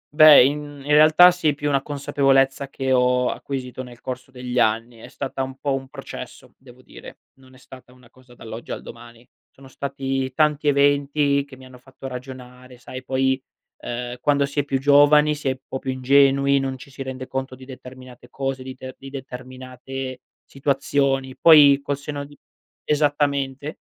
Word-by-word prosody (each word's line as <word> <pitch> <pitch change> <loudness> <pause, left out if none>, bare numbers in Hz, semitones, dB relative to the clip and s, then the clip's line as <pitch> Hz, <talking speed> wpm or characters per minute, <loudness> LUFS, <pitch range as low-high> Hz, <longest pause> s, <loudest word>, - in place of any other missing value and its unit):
Beh, 155 -3 +9
in 145 0 -4
in 145 - -3
realtà 155 +4 +7
sì, 160 -5 0
più 145 +1 -3
una 140 -1 +1
consapevolezza 135 -1 +1
che 135 -1 -3
ho 125 0 +2
acquisito 130 -2 -6
nel 125 -2 -12
corso 130 +1 -7
degli 125 -1 -4
anni. 115 +1 0
È - - -11
stata 135 -1 -5
un 130 0 -5
po' 140 0 -2
un 135 0 -4
processo, - - -10
devo 130 -1 -18
dire. - - -13 0.2
Non 130 -1 -19
è - - -17
stata 130 -1 -15
una 125 -2 -21
cosa 130 -1 -20
dall'oggi 115 0 -10
al - - -6
domani. 120 0 -13 0.2
Sono 135 0 -17
stati 135 -1 -4
tanti 150 -1 +1
eventi 140 0 +2
che 140 -2 -14
mi 130 - -14
hanno 130 -1 -15
fatto 130 +1 -15
ragionare; 125 -1 -10
sai, 130 +1 -10
poi, 130 0 0 0.4
uhm, 120 +1 -5
quando 140 +1 +2
si 140 +1 -4
è - - +2
più 135 -1 -1
giovani 145 +2 +5
si 150 -2 -6
è - - +2
un - - -16
po' 130 - -5
più 130 - -6
ingenui, 140 +1 +3
non 135 -1 -3
ci 135 +2 -14
si 135 - -10
rende 130 -1 -6
conto 130 0 -5
di 130 0 -14
determinate 130 -1 -13
cose, 135 0 -4
di 130 0 -8
te 130 0 -9
di 135 - -10
determinate 130 0 -8 0.2
situazioni. 135 -1 -1
Poi 145 -4 +7
col 140 0 -3
senno 145 0 -6
di 145 0 -14 0.5
esattamente. 145 -1 -1
135 Hz, 180 wpm, -22 LUFS, 130-140 Hz, 0.5 s, Beh